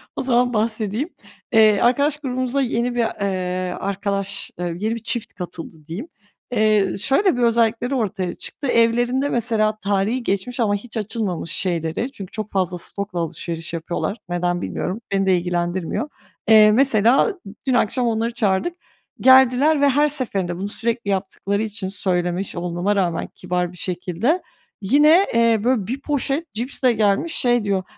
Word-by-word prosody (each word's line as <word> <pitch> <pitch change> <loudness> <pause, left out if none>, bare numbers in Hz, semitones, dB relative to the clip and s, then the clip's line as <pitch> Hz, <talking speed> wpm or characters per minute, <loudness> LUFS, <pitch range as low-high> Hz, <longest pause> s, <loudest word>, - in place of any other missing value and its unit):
O - - -2
zaman 245 -1 +2
bahsedeyim. 220 - -1 0.4
Eee, 215 -2 +6
arkadaş 280 +5 +3
grubumuza 255 -1 -1
yeni 240 -1 -1
bir, 240 - +2 0.2
eee, 185 -2 -2
arkadaş, 200 0 -3
eee, 180 - -2
yeni 220 +3 -1
bir 230 - -8
çift 230 0 -3
katıldı, 175 -2 -7
diyeyim. 195 - -6 0.4
Eee, 215 -4 +2
şöyle 275 - +2
bir - - -1
özellikleri 235 +2 +2
ortaya 195 -7 -2
çıktı. 280 - -5
Evlerinde 240 +4 +2
mesela 220 -3 +1
tarihi 205 +6 0
geçmiş 200 +6 -2
ama 210 -3 +2
hiç 225 +2 -7
açılmamış 205 -6 -3
şeyleri, 175 - -2
çünkü 195 -8 -9
çok 215 -1 -5
fazla 185 -2 0
stokla 195 +1 -5
alışveriş 165 0 -4
yapıyorlar, 170 +5 -3
neden 175 0 -1
bilmiyorum, 200 +6 -3
beni 195 0 +1
de 185 -2 +4
ilgilendirmiyor. 175 - -2 0.4
Eee, 215 -1 +8
mesela 255 - +3 0.3
dün 260 - +2
akşam 245 +1 +1
onları 230 +1 0
çağırdık, 225 - 0 0.5
geldiler 265 +3 +5
ve 285 - +5
her 290 +3 +3
seferinde, 200 -12 -2
bunu 195 +2 -4
sürekli 230 0 -3
yaptıkları 200 +1 -1
için 210 -3 -4
söylemiş 180 -1 -2
olmama 175 +3 -1
rağmen 180 -4 0
kibar 180 -1 -2
bir 180 - -14
şekilde, 185 - -1 0.4
yine, 300 - +5
eee, 230 -2 +3
böyle, 235 -5 +1
bir 265 +4 -4
poşet 290 +3 -2
cipsle 250 +2 0
gelmiş 215 +9 +1
şey 240 -2 +2
diyor, 195 -2 0
215 Hz, 150 wpm, -21 LUFS, 190-245 Hz, 0.5 s, Eee